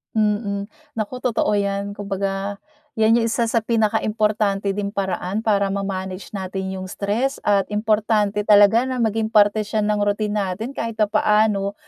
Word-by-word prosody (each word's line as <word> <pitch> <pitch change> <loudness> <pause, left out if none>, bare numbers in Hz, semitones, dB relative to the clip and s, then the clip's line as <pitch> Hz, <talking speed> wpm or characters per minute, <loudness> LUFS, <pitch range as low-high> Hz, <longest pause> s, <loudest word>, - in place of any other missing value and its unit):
Mm. 205 -1 0 0.2
Naku 225 +3 -4
totoo 230 -4 0
'yan. 200 0 -2
Kumbaga, 200 0 -3 0.4
'yan 225 +1 +4
'yong 230 - +1
isa 230 0 0
sa 230 - +3
pinaka 220 -1 +1
importante 210 -2 0
ding 200 +1 -3
paraan 190 +2 -2
para 200 -3 +2
ma-manage 190 -2 -4
natin 190 -1 -4
'yung 185 - -6
stress, 215 +8 -2
at 200 -2 +2
importante 210 -1 +1
talaga 210 +4 +6
na 255 -2 -2
maging 220 0 0
parte 210 -1 +3
siya 215 0 -1
ng 210 0 +1
routine 210 +1 0
natin 200 +5 -3
kahit 230 -4 -4
papaano 210 -1 +2
210 Hz, 150 wpm, -21 LUFS, 200-220 Hz, 0.4 s, talaga